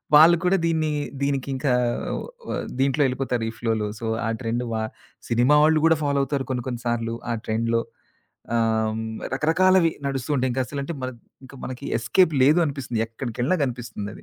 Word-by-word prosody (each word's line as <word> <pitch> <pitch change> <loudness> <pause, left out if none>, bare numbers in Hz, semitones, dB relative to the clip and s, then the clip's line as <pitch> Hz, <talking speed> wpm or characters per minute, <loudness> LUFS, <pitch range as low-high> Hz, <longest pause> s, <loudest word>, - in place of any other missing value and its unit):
వాళ్ళు 165 +3 +8
కూడా 185 +2 +3
దీన్ని 160 -2 +1 0.3
దీనికింకా 135 -1 0 0.7
వ - - -4 0.3
దీంట్లో 135 +2 +2
ఎళ్ళిపోతారు 125 -2 -1
ఈ - - -5
ఫ్లోలో. 110 -2 0
సో 115 - -5 0.2
ఆ - - 0
ట్రెండ్ 120 0 -2
బ - - -1 0.5
సినిమా 125 +5 +4
వాళ్ళు 155 0 +5
కూడా 165 0 +6
ఫాలో 140 -1 +1
అవుతారు 140 -1 -1
కొన్ని 125 -2 -2
కొన్ని 120 -2 -4
సార్లు 115 -1 -1 0.2
ఆ - - +1
ట్రెండ్‌లో. 115 +1 +1 0.7
ఆహ్, 110 -1 +1 0.4
రకరకాలవి 165 +4 +4 0.2
నడుస్తూంటాయి. 135 -1 0
ఇంక 130 - -1
అసలంటే 140 +5 -4
ప - - -8
మన 130 - -2 0.3
ఇంకా 135 +1 -12
మనకి 130 -1 -6
ఎస్‌కేప్ 160 +9 +3
లేదు 150 +5 +5
అనిపిస్తుంది. 135 -6 -3
ఎక్కడికెళ్ళినా 120 +7 -2
కనిపిస్తుందది. 115 -5 -6
130 Hz, 155 wpm, -24 LUFS, 115-150 Hz, 0.7 s, వాళ్ళు